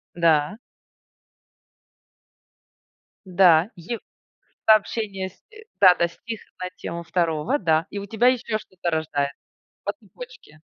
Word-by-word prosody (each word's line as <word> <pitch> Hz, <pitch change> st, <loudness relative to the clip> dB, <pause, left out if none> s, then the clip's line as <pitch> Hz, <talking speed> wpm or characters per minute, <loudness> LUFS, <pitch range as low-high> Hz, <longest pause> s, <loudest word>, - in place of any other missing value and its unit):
Да. 165 Hz, +3 st, +2 dB, 2.7 s
Да. 180 Hz, -1 st, +5 dB
Ев 180 Hz, +7 st, -5 dB, 0.7 s
Сообщение 210 Hz, -3 st, +2 dB
с, -, -, -26 dB
э 435 Hz, +1 st, -14 dB, 0.2 s
Да-да, 180 Hz, -2 st, +6 dB
стих 225 Hz, +6 st, -8 dB, 0.2 s
на 180 Hz, -, -3 dB
тему 170 Hz, 0 st, -6 dB
второго, 165 Hz, -, 0 dB
да. 160 Hz, -2 st, +2 dB
И 200 Hz, -, -5 dB
у 200 Hz, -, -6 dB
тебя 225 Hz, +4 st, +2 dB
ещё 240 Hz, -3 st, +1 dB
что-то 180 Hz, -4 st, -5 dB
рождается 145 Hz, -3 st, -1 dB, 0.5 s
По -, -, -2 dB
цепочке. -, -, -14 dB
185 Hz, 110 wpm, -24 LUFS, 165-220 Hz, 2.7 s, Да-да